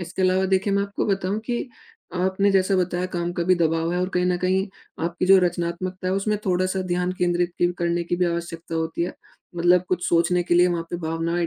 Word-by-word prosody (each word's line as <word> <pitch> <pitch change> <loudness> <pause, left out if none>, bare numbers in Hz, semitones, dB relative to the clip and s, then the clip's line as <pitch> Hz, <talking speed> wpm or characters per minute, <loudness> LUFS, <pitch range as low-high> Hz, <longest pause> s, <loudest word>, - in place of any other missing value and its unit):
इसके 175 +2 -4
अलावा 185 +1 +3
देखिए 190 +1 +1
मैं 200 0 +2
आपको 200 0 -3
बताऊँ 195 0 0
कि 245 +1 -2 0.5
आपने 190 +2 +1
जैसा 195 0 +2
बताया 180 0 0
काम 175 -1 -3
का 175 - -2
भी 185 +1 +4
दबाव 165 0 0
है 180 - 0
और 185 - 0
कहीं 180 0 +2
न 180 -1 +2
कहीं 190 +2 +1 0.4
आपकी 170 +2 -1
जो 195 +1 +8
रचनात्मकता 180 +1 -2
है। 185 - +1
उसमें 210 +2 0
थोड़ा-सा 185 +1 +1
ध्यान 180 0 -1
केंद्रित 175 0 +1
की 175 0 +3
करने 170 0 0
की 175 - -1
भी 180 - +1
आवश्यकता 170 -1 -4
होती 160 +1 -1
है। 175 - -2 0.4
मतलब 175 +1 +4
कुछ 180 -1 -1
सोचने 175 +1 +2
के 175 - 0
लिए, 175 +1 +6
वहाँ 170 -2 -1
पे 175 - -2
भावनाएँ 165 +1 -1
180 Hz, 220 wpm, -23 LUFS, 170-185 Hz, 0.5 s, जो